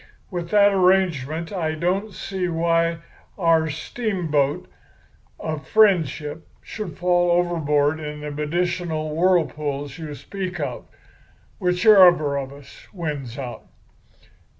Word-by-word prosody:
With 175 -2 -4
that 205 0 +5
arrangement 175 -4 +1
I 160 -4 -1
don't 185 +6 -1
see 190 0 -4
why 165 0 +1 0.4
our 165 -4 +3
steamboat 160 - -1 0.7
of 155 -2 -5
friendship 165 - +2 0.2
should 205 -8 -7
fall 175 0 +2
overboard 160 -4 +1
in 150 -1 -6
the 150 0 -5
medicinal 155 0 -2
whirlpools 150 -5 0
you 155 -2 -6
speak 185 +2 -6
of, 130 -5 -4 0.7
whichever 180 -5 +5
of 135 -1 -4
us 140 -1 -14
wins 150 - -5
out. 125 -4 -7
165 Hz, 105 wpm, -23 LUFS, 150-180 Hz, 0.7 s, that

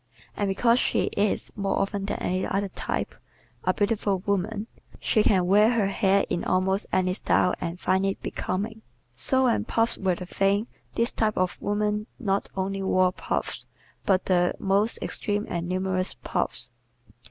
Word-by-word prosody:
And 205 - 0
because 230 +5 +3
she - - +1
is, 205 0 0
more 200 -1 -1
often 195 0 -1
than - - -2
any 185 +1 -1
other 200 0 -1
type, - - -3 0.5
a - - +3
beautiful 205 -2 0
woman 205 +2 -1 0.3
she 215 - +2
can 190 -4 +3
wear 210 +5 +5
her 210 -4 +2
hair 195 0 +2
in 175 - -2
almost 190 +2 +1
any 185 -1 +2
style 180 -1 +2
and 170 +1 -4
find 190 +1 +1
it 195 - -2
becoming. 215 +4 -3 0.3
So 260 - +3
when 245 -3 +2
puffs 230 0 +1
were 190 -2 +1
the 180 - -7
thing 195 +3 +1 0.3
this 235 +1 +1
type 215 -1 0
of 185 0 0
woman 210 +1 0
not 200 -5 -1
only 195 +1 -1
wore 185 -1 +3
puffs - - -3 0.4
but 190 -2 +2
the 180 -1 +2
most 200 +3 +2
extreme 205 0 -1
and 170 0 -3
numerous 185 0 0
puffs. - - -3
195 Hz, 165 wpm, -26 LUFS, 185-210 Hz, 0.5 s, wear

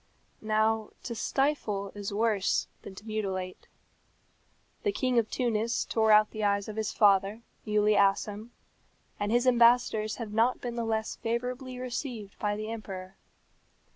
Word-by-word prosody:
Now 220 0 +1
to 240 - -4
stifle 225 -5 -1
is 205 -1 -5
worse 210 -2 +1 0.2
than 190 - -10
to 205 - -12
mutilate. 190 -4 -4 1.1
The 415 - +1
King 255 -10 +1
of 220 - -1
Tunis 235 -1 0
tore 220 -1 +2
out 215 0 +6
the 215 -1 -4
eyes 200 -1 +1
of 215 - -6
his 220 -1 -2
father, 200 +2 +3 0.2
Muley 210 0 +3
Assem, 205 +2 +1 0.7
and 205 +1 -1
his 240 +2 +3
ambassadors 235 -3 +4
have 225 -3 -6
not 230 +3 +2
been 240 -1 -5
the 235 -1 -2
less 220 -1 -2
favourably 250 +2 -3
received 245 -4 -5
by 205 -1 0
the 215 +1 -5
emperor. 190 -4 -7
220 Hz, 145 wpm, -29 LUFS, 205-235 Hz, 1.1 s, out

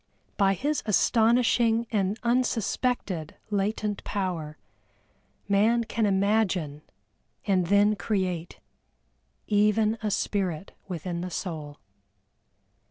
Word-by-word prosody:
By 195 -1 +3
his 290 - -1
astonishing 230 +1 +3
and 200 -1 0
unsuspected 235 - -1 0.2
latent 205 +1 -1
power, 175 -7 -3 0.9
Man 215 +4 +3
can 225 -1 0
imagine 190 -7 +1 0.6
and 185 -4 +2
then 205 +2 +4
create, 185 -6 -2 0.9
even 210 +1 +2
a 215 - -1
spirit 190 -4 -2 0.2
within 175 -1 -4
the 180 - -4
soul. 155 -6 -5
200 Hz, 90 wpm, -27 LUFS, 180-220 Hz, 0.9 s, then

